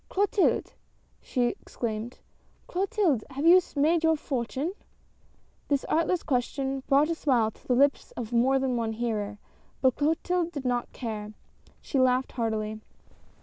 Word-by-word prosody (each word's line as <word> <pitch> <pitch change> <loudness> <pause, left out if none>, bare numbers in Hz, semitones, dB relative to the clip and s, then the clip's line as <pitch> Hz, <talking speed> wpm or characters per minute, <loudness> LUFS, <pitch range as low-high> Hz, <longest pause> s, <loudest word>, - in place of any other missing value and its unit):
" - - -38
Clotilde! 400 0 +1 0.3
" - - -38
she 250 - -1
exclaimed, 230 0 -5 0.3
" - - -36
Clotilde! 375 - +1
Have 280 +3 -4
you 360 +2 +8
made 315 +4 +3
your 320 0 +4
fortune? 275 +3 -3 0.5
" - - -37
This 280 -2 0
artless 335 +2 +1
question 270 0 -1
brought 285 +3 +4
a - - +2
smile 250 -9 +1
to - - -24
the 250 - +3
lips 280 +2 +2
of 240 -1 -6
more 255 +3 +4
than 260 -2 0
one 225 -1 -1
hearer, 215 -3 -2 0.4
but 260 -2 +2
Clotilde 335 +3 0
did 285 -3 -5
not 245 -1 -1
care; 215 -3 -5 0.5
she 275 - -1
laughed 255 0 +2
heartily. 220 -2 -2
265 Hz, 155 wpm, -27 LUFS, 235-315 Hz, 0.5 s, you